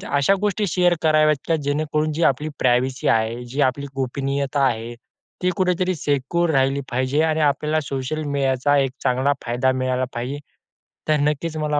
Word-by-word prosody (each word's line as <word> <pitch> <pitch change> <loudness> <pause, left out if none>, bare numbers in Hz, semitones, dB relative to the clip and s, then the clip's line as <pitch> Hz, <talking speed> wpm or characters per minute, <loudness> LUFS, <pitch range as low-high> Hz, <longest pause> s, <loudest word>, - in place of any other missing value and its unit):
अशा 140 +7 +3
गोष्टी 210 0 0
शेअर 180 0 +2
कराव्यात 155 -1 +4
की 165 - +2
जेणेकरून 150 +2 0
जी 165 +3 -1
आपली 150 +4 -6
प्रायव्हसी 130 +2 +1
आहे 115 +2 -3
जी 130 +4 -3
आपली 140 +2 -7
गोपनीयता 140 +1 -1
आहे. 120 -1 -2 0.5
ती 180 - +3
कुठेतरी 185 0 +1
सिक्युअर 150 +4 0
राहिली 135 -1 +2
पाहिजे 130 +4 +1
आणि 160 -1 +1
आपल्याला 150 +1 +1
सोशल 140 +3 -4
मीडियाचा 135 +1 +1
एक 135 -2 +1
चांगला 130 +3 +2
फायदा 125 +2 +1
मिळायला 130 0 -1
पाहिजे. 125 +4 -4 0.7
तर 155 - +4
नक्कीच 150 +2 -1
मला 150 -1 0
140 Hz, 160 wpm, -22 LUFS, 130-155 Hz, 0.7 s, कराव्यात